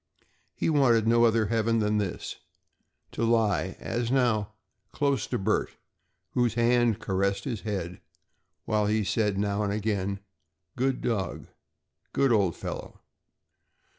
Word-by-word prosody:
He - - -1
wanted 130 -8 +4
no 115 +1 +5
other 115 -1 +3
heaven 115 +1 +1
than 105 -1 +1
this 100 -4 -4 0.7
to - - -3
lie, 110 -5 +1
as 115 0 -2
now, 115 -6 +1 0.4
close 140 -4 0
to - - -1
Bert, 105 +3 -1 0.5
whose 120 -3 +1
hand 120 -2 +3
caressed 100 +1 -1
his 120 -7 -4
head 90 -5 -4 0.6
while 105 -1 +1
he 110 0 +1
said 105 +1 0
now 100 +1 0
and 100 -1 0
again: 100 -2 -1 0.6
"Good 130 +1 0
dog"; 100 -8 -2 0.6
"Good 135 -2 +3
old 100 -7 +2
fellow!" - - -7
110 Hz, 130 wpm, -27 LUFS, 100-120 Hz, 0.7 s, no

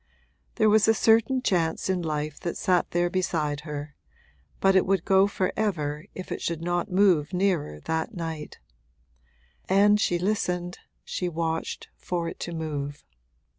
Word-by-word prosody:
There 220 - +3
was 215 0 +5
a 225 - +5
certain 225 +4 +3
chance 165 -6 0
in 185 -2 0
life 150 -2 -3
that 170 - -4
sat 180 -3 +1
there 175 0 +1
beside 165 -5 -1
her, 150 -1 -6 0.7
but 195 0 +4
it 190 - +4
would 190 -3 +1
go 190 0 +5
for 190 -2 -1
ever 155 -8 -1
if 185 - -7
it - - -3
should 165 -1 -3
not 175 +3 -1
move 180 -4 +3
nearer 180 - 0
that 160 +5 -2
night; 160 -3 -5 1.1
and 205 +2 +5
she 175 - +2
listened, 180 -2 -1 0.3
she 180 - -2
watched, 165 -1 -3
for 175 -2 -3
it 165 - -7
to 175 - -4
move. 145 -3 -4
175 Hz, 155 wpm, -26 LUFS, 160-195 Hz, 1.1 s, was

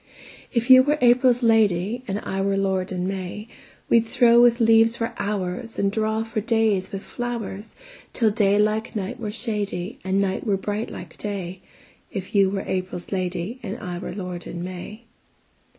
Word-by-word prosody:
If 240 +1 +1
you 255 0 +10
were 295 +3 +1
April's 245 0 +4
lady, 220 0 +2
And 195 - -2
I 195 0 -3
were 195 0 +1
lord 190 -1 0
in 180 0 -2
May, 195 +2 -5 0.4
We'd 230 -1 +3
throw 235 0 +5
with 240 0 +5
leaves 225 0 +5
for 230 -1 -3
hoursAnd 200 +1 -2
draw 220 +1 0
for 225 -1 -3
days 220 -4 +1
with 195 0 -5
flowers, 230 -4 -5 0.4
Till 225 -3 +2
day 205 -2 +3
like 215 +2 0
night 200 +3 -4
were 220 -3 -4
shadyAnd 205 -4 -3
night 195 -1 0
were 205 -4 +1
bright 210 +3 -3
like 175 -2 -10
day; 190 -3 -5 0.5
If 190 +2 -6
you 195 -2 +4
were 195 0 -3
April's 185 -1 -4
lady, 185 +4 -3
And 205 -3 -5
I 175 -1 -5
were - - -6
lord 180 -3 -6
in 175 0 -5
May. 185 +5 -7
205 Hz, 165 wpm, -23 LUFS, 190-230 Hz, 0.5 s, you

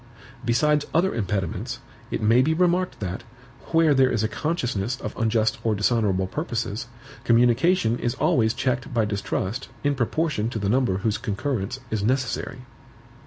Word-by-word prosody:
Besides 150 +5 +2
other 180 +4 +3
impediments, 95 -5 -2 0.3
it - - -3
may 115 +4 +5
be 160 +4 +2
remarked 180 +1 +1
that, 95 +2 -3 0.5
where 165 -2 +4
there 130 -1 +4
is 115 -3 0
a - - +2
consciousness 120 - -2
of 105 - -6
unjust 110 -1 +1
or 110 -2 +1
dishonorable 105 -3 +1
purposes, 120 - -3 0.4
communication 120 +2 +3
is 120 - -1
always 125 -8 +2
checked 130 +2 -1
by 115 -2 +3
distrust 105 +3 -3
in 145 0 +2
proportion 130 -2 0
to 115 - -4
the 100 -2 -1
number 120 -5 +2
whose 105 +1 -1
concurrence 120 +1 -2
is 110 -2 0
necessary. 130 +2 -1
120 Hz, 150 wpm, -24 LUFS, 105-140 Hz, 0.5 s, may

